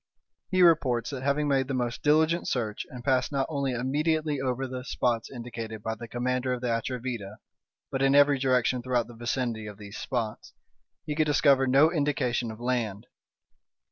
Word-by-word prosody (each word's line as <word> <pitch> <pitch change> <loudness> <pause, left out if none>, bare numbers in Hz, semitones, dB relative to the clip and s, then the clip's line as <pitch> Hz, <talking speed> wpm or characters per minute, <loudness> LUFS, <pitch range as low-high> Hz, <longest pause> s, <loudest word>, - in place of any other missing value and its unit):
He 185 -1 +4
reports 130 -9 +3
that, 135 -3 -5
having 140 +2 +1
made 135 -2 +2
the 135 - -2
most 120 -1 -2
diligent 160 +3 +3
search 110 -4 -2
and 125 -1 -9
passed 130 0 +1
not 135 -1 0
only 140 -4 -1
immediately 150 +3 0
over 130 0 -1
the 130 0 -6
spots 120 -3 -1
indicated 115 -3 -7
by 110 - -2
the 115 +1 -8
commander 125 +2 -1
of 125 - -4
the 125 - -1
Atrevida, 115 -4 -4 0.5
but 135 - -2
in 135 0 +4
every 145 -1 +5
direction 130 -1 +2
throughout 120 -1 0
the 120 - -12
vicinity 120 -2 -2
of 105 -1 -9
these 105 0 -9
spots, 115 -5 -4 0.5
he 150 - -2
could 155 0 +1
discover 140 -2 +4
no 140 +5 +5
indication 140 -7 0
of 110 0 -8
land. 120 -4 -2
125 Hz, 175 wpm, -27 LUFS, 120-140 Hz, 0.5 s, every